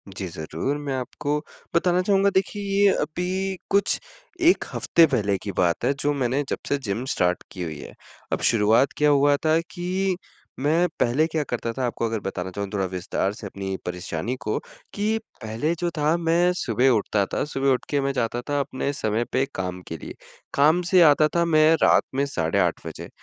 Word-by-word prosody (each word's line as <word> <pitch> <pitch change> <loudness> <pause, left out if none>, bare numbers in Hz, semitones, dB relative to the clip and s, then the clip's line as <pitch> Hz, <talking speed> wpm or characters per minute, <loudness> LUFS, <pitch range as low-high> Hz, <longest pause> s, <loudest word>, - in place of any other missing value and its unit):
जी, 95 - -4
ज़रूर 85 - -3
मैं 145 -2 -4
आपको 145 +3 -2 0.4
बताना 180 +1 +3
चाहूँगा 195 +1 +3
देखिए 195 +2 0 0.2
ये 200 - +7
अभी 185 +4 -2
कुछ 200 0 +2 0.5
1 360 - +2
हफ्ते 170 - +4
पहले 105 -8 0
की 100 - -3
बात 90 +4 +1
है 135 - +3
जो 145 +1 +1
मैंने 135 +1 0
जब - - -1
से 145 - +2
जिम 105 +4 -2
स्टार्ट 90 0 0
की 95 - -8
हुई 80 -3 -5
है, - - -10 0.4
अब - - -1
शुरुआत 115 +4 +3
क्या 150 0 +4
हुआ 145 0 +4
था 160 +1 +4
कि, 185 +1 -1 0.4
मैं 160 +6 +2
पहले 130 +7 +3
क्या 160 -2 -1
करता 115 -1 -2
था 130 0 -2
आपको 115 -1 -2
अगर 115 -1 -1
बताना 95 -2 -4
चाहूँ 100 +1 -4
थोड़ा 95 -2 0
विस्तार 95 +2 -2
से 105 -1 -8
अपनी 95 0 -5
परेशानी 90 +5 -3
को, 105 - 0 0.4
कि 215 +2 0 0.3
पहले 115 +10 -1
जो 175 - 0
था 150 +2 +2
मैं 170 +1 +2
सुबह 125 - +2
उठता 105 -3 +2
था। - - 0
सुबह 135 -2 -1
उठके 140 +2 0
मैं 140 - 0
जाता 120 -1 -1
था 145 0 +1
अपने 140 0 -2
समय 110 -3 0
पे 130 +1 +2
काम 90 -1 -4
के 80 - -5
लिए, - - -9 0.4
काम 155 +5 +4
से 185 -2 +7
आता 155 -1 +6
था 170 0 +3
मैं 155 -1 +5
रात - - +5
में 140 - +2
साढ़े 85 -12 -1
8 - - 0
बजे, - - -8
135 Hz, 195 wpm, -24 LUFS, 105-165 Hz, 0.5 s, ये